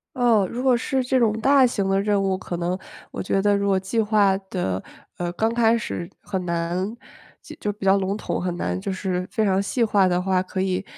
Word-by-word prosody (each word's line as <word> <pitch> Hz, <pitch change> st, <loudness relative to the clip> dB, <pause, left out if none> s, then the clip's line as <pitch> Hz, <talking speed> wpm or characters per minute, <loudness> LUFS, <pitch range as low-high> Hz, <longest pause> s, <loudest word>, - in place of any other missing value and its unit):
哦， 235 Hz, -6 st, +3 dB
如 245 Hz, +2 st, -4 dB
果 260 Hz, -2 st, +4 dB
是 260 Hz, +2 st, -1 dB
这 255 Hz, +1 st, +1 dB
种 220 Hz, -2 st, +2 dB
大 270 Hz, +3 st, +5 dB
型 205 Hz, -5 st, 0 dB
的 195 Hz, 0 st, +2 dB
任 205 Hz, -1 st, +1 dB
务， 190 Hz, -1 st, 0 dB
可 175 Hz, -2 st, -5 dB
能 175 Hz, +2 st, -1 dB, 0.3 s
我 -, -, -5 dB
觉 195 Hz, +1 st, 0 dB
得 205 Hz, 0 st, +3 dB
如 200 Hz, 0 st, 0 dB
果 195 Hz, -1 st, +3 dB
计 195 Hz, +5 st, -2 dB
划 210 Hz, -3 st, +3 dB
的， 95 Hz, -, -2 dB, 0.3 s
呃， 175 Hz, -1 st, -2 dB
刚 220 Hz, +5 st, 0 dB
开 235 Hz, -1 st, +3 dB
始 175 Hz, -6 st, -5 dB
很 190 Hz, -3 st, -3 dB
难 175 Hz, +5 st, -2 dB, 0.6 s
就 210 Hz, -, -1 dB
比 205 Hz, -1 st, -8 dB
较 195 Hz, 0 st, +5 dB
笼 195 Hz, +1 st, -1 dB
统， -, -, -3 dB
很 175 Hz, -1 st, -2 dB
难 90 Hz, -, -2 dB
就 -, -, -3 dB
是 185 Hz, -1 st, -2 dB
非 220 Hz, -, +1 dB
常 195 Hz, -1 st, +2 dB
细 235 Hz, +4 st, 0 dB
化 205 Hz, -4 st, +3 dB
的 180 Hz, -1 st, +1 dB
话， 185 Hz, 0 st, +1 dB
可 185 Hz, 0 st, -4 dB
以， 190 Hz, 0 st, -1 dB
195 Hz, 240 characters per minute, -23 LUFS, 185-220 Hz, 0.6 s, 大